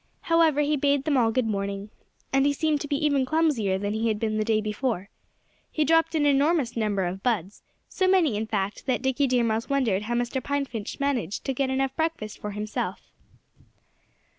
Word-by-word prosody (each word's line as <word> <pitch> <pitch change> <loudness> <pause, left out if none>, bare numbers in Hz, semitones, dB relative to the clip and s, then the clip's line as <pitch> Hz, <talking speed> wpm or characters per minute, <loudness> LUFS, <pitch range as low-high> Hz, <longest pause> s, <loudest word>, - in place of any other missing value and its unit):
However, 330 -3 +3
he 295 +1 +1
bade 280 0 +2
them 295 -1 +1
all 235 -3 +3
good 255 +1 +1
morning. 200 -1 -3 0.4
And 270 +1 +4
he 285 - +2
seemed 300 0 0
to 295 - -4
be 285 - 0
even 285 -3 +2
clumsier 260 -10 +1
than 205 +1 -2
he 220 +1 0
had 215 -2 0
been 215 -1 -1
the - - +2
day 220 0 +2
before. 215 -2 -2 0.6
He 310 - +1
dropped 325 +2 +3
an 300 -2 +2
enormous 285 -2 +2
number 210 -4 0
of 185 +2 -4
buds; 205 -5 -1 0.3
so 375 - 0
many, 355 - +3
in 215 +1 -2
fact, 205 +3 -3
that 255 -2 0
Dickie 265 +1 +1
Deer 250 -2 +2
Mouse 225 0 -1
wondered 245 -9 +1
how 235 +3 -2
Mr. 245 +2 -1
Pine 285 +1 -1
Finch 225 -3 -6
managed 255 - -1
to 270 - -1
get 265 +1 -1
enough 265 0 -1
breakfast 320 -10 -3
for 210 - -5
himself. 210 +1 -4
250 Hz, 200 wpm, -26 LUFS, 215-285 Hz, 0.6 s, And